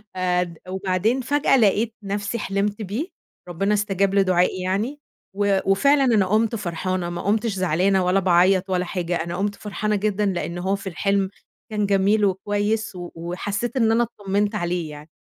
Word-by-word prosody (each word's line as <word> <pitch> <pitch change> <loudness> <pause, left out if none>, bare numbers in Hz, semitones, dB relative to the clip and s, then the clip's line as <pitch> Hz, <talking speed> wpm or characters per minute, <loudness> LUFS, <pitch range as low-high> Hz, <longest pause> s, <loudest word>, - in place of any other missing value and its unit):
آآ، 180 -1 0 0.2
وبعدين 190 +6 0
فجأة 285 +1 +2
لقيت 220 +1 +2
نفْسي 205 +3 -3
حلِمت 205 +1 -1
بيه، 215 - -3 0.4
ربنا 195 +5 0
استجاب 200 -1 +1
لدُعائي 185 -1 +2
يعني 215 +10 -1 0.3
و 200 -1 +2
وفعلًا 275 +9 +4
أنا 225 -7 +3
قُمت 220 +4 +1
فرحانة، 185 -2 -2
ما 175 - -4
قُمتش 215 +2 0
زعلانة 185 +1 +1
ولا 185 +2 +3
باعيّط 185 +1 +3
ولا 180 -1 0
حاجة، 175 -1 -2
أنا 170 +1 -3
قُمت 205 +1 -1
فرحانة 210 +1 -2
جدًا 210 0 0
لإنه 175 -2 -2
هو 190 +2 0
في 195 -1 -6
الحلم 195 +2 0 0.4
كان 210 -1 0
جميل 200 +2 +3
وكويس 205 +2 -1
و 175 -1 -7
وحسّيت 195 +8 -3
إن 225 -3 +3
أنا 230 +1 +3 0.2
اطّمنت 205 +2 0
عليه 175 -4 -2
يعني. 150 +1 -11
195 Hz, 160 wpm, -23 LUFS, 185-210 Hz, 0.4 s, وفعلًا